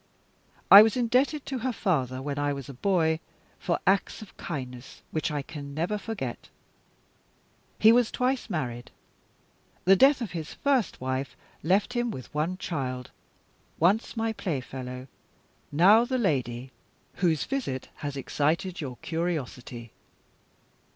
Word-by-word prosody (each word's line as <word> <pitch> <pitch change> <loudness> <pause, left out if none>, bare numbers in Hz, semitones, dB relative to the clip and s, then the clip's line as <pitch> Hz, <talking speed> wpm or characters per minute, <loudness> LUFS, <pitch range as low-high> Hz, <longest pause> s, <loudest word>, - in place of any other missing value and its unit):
I 200 - +13
was 220 +2 +3
indebted 255 +5 +1
to 265 -2 -3
her 255 +2 -1
father, 135 - -1
when 145 0 -3
I 145 0 +1
was 140 -3 -7
a 140 - -8
boy, 160 +1 +1 0.4
for 170 - 0
acts 195 +3 +1
of 210 - -15
kindness 125 -5 -7
which 155 - -1
I 145 -2 -2
can 140 -1 -8
never 180 +7 -1
forget. 195 - -5 1.3
He 220 - +7
was 240 -1 +4
twice 255 0 -1
married. 125 - -3 1.0
The 190 +2 +7
death 270 +7 +5
of 230 -7 -4
his 160 -3 -6
first 270 -6 +1
wife 130 0 -3 0.3
left 195 +8 +2
him 240 -1 0
with 130 - -8
one 160 +5 -1
child 130 -9 -4 0.7
once 200 +8 +2
my 225 0 0
playfellow; 130 - -5 0.6
now 195 +10 +6
the 255 +1 -1
lady 130 - -1 0.5
whose 165 -5 +2
visit 245 - -3
has 145 -2 -5
excited 170 +7 -1
your 130 -4 -5
curiosity. 130 -8 -4
165 Hz, 135 wpm, -27 LUFS, 135-220 Hz, 1.3 s, I